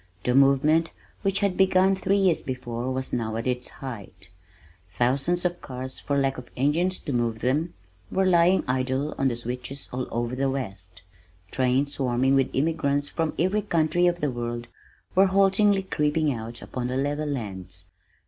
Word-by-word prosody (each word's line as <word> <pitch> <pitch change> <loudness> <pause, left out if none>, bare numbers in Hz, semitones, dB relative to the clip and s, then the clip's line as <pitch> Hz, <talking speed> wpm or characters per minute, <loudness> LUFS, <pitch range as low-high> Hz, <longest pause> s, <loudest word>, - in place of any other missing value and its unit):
The 125 - +1
movement 140 +5 +4 0.3
which 195 0 +1
had 200 -2 +1
begun 190 0 +4
three 190 +1 +1
years 190 -4 +3
before 125 -1 -4
was 130 0 -3
now 110 -2 -1
at 115 - -3
its 125 -1 -2
height. 110 - -9 0.6
Thousands 140 - +1
of 175 0 -1
cars, 130 -1 -4
for 140 0 -1
lack 135 -1 0
of 125 - -12
engines 165 +8 +2
to 145 - -4
move 115 -2 -1
them, 150 +8 0 0.4
were 190 0 +2
lying 180 +1 +4
idle 130 +3 -1
on 135 - +3
the 120 - 0
switches 125 +3 -6
all 125 0 -3
over 120 +2 -2
the 135 +1 0
west. 95 -9 -5 0.5
Trains 130 +2 +1
swarming 130 0 +1
with 135 -1 +3
immigrants 145 -1 0
from 160 -2 -2
every 185 +5 +1
country 175 -2 +2
of 175 0 0
the 145 - +1
world 120 -1 -4 0.4
were 190 +1 +5
haltingly 195 +1 +3
creeping 150 -4 0
out 115 0 -7
upon 125 -1 -4
the 130 +1 -2
level 145 +2 -1
lands. 95 -8 -6
135 Hz, 165 wpm, -25 LUFS, 125-170 Hz, 0.6 s, were